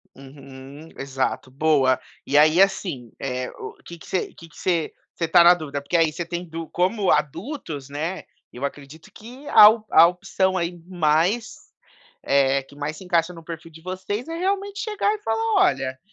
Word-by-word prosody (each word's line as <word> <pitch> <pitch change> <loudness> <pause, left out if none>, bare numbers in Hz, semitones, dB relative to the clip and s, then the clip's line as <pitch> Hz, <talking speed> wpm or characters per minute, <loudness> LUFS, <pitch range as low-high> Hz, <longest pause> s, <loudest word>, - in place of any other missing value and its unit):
Uhum. 135 +2 -13
Exato! 135 -1 -3
Boa. 135 -2 +2 0.3
E 145 - +1
aí 155 +5 +6
assim, 180 - 0
eh, 125 -1 -3
o - - -9
que 170 -1 -11
se 185 - -3
que 165 0 -14
se 170 -4 -1 0.2
você 165 - -2
tá 170 +1 +6
na 175 +1 +8
dúvida? 145 -4 -5
Porque 155 +5 0
aí 165 -2 +3
você 175 +2 -5
tem 175 +1 -5
du 165 0 -7
como 190 +2 +1
adultos, 150 - -3
né. 160 +6 -4 0.3
Eu 125 - -9
acredito 145 +3 -9
que 250 +6 -13
a 210 - +9
a 220 +1 +4 0.2
a - - +8
opção 190 +1 -1
aí 175 0 -3
mais, 175 +6 +1 0.7
eh, 135 0 +2
que 140 - -18
mais, 145 +2 -5
se - - -11
encaixa 180 -1 0
no 165 -1 -12
perfil 165 0 -9
de 160 +1 -15
vocês 190 - -5
é 330 - -5
realmente 395 +2 -2
chegar 420 -1 0
e 430 - -5
falar: 225 0 -1
"Olha, 130 -1 0
165 Hz, 180 wpm, -23 LUFS, 140-190 Hz, 0.7 s, a